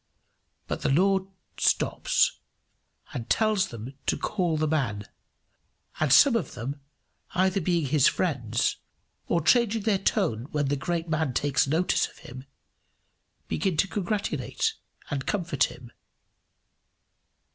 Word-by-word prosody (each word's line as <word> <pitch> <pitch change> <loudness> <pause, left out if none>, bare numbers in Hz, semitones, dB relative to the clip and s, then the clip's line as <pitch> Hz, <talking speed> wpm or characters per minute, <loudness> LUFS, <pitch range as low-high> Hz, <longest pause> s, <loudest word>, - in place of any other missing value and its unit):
But - - -4
the 150 - 0
Lord 190 +6 +3 0.3
stops, - - +2 0.7
and 115 -1 -5
tells 215 -3 +2
them 115 +3 -8
to - - +1
call 175 -6 -1
the 155 0 +1
man; 130 -10 -1 1.0
and 155 -4 +1
some 255 - +7
of 225 - -2
them, 135 +4 -5 0.5
either 190 +1 +2
being 170 -2 +1
his 140 0 +4
friends, 120 - 0 0.5
or 170 - +1
changing 225 +1 +3
their 200 -3 +2
tone 150 - 0
when 145 -2 -1
the 145 - +1
great 170 +4 -2
man 155 -4 -1
takes 140 -1 +2
notice 160 +6 +1
of - - -19
him, 130 +2 -11 1.0
begin 190 -5 -1
to 195 - +3
congratulate 210 - -2 0.4
and 135 -2 -3
comfort 170 -9 +1
him. 120 -1 -11
160 Hz, 125 wpm, -27 LUFS, 135-190 Hz, 1.0 s, some